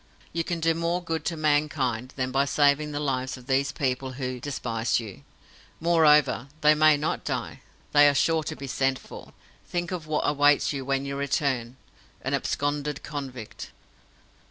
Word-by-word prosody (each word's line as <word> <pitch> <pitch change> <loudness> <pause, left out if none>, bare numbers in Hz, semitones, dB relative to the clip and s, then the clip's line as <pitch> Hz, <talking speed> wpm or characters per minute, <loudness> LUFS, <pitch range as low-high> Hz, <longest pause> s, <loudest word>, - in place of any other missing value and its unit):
You 165 0 0
can 170 0 -3
do 165 0 +2
more 170 +2 -1
good 165 -1 -3
to 165 - -2
mankind 145 -5 0
than 130 -1 -2
by 135 +1 +2
saving 145 +1 +2
the 145 - -3
lives 130 -3 -2
of 125 - -14
these 135 +1 +1
people 130 -1 -2
who 130 -1 -4
despise 120 -4 -1
you. 105 -10 -9 0.6
Moreover, 150 -5 +4
they 150 0 +6
may 155 0 +5
not 150 +2 -2
die. - - -4 0.3
They 145 0 +7
are 140 - 0
sure 160 +3 +2
to - - -4
be 140 - -8
sent 135 0 0
for. - - -12 0.4
Think 175 0 -3
of 170 -4 -5
what 155 -1 0
awaits 145 0 +3
you 135 -1 -4
when 135 0 0
you 140 0 -4
return 135 -3 -1 0.5
an - - -2
absconded 145 0 -1
convict!" 135 -6 -7
145 Hz, 170 wpm, -26 LUFS, 130-155 Hz, 0.6 s, They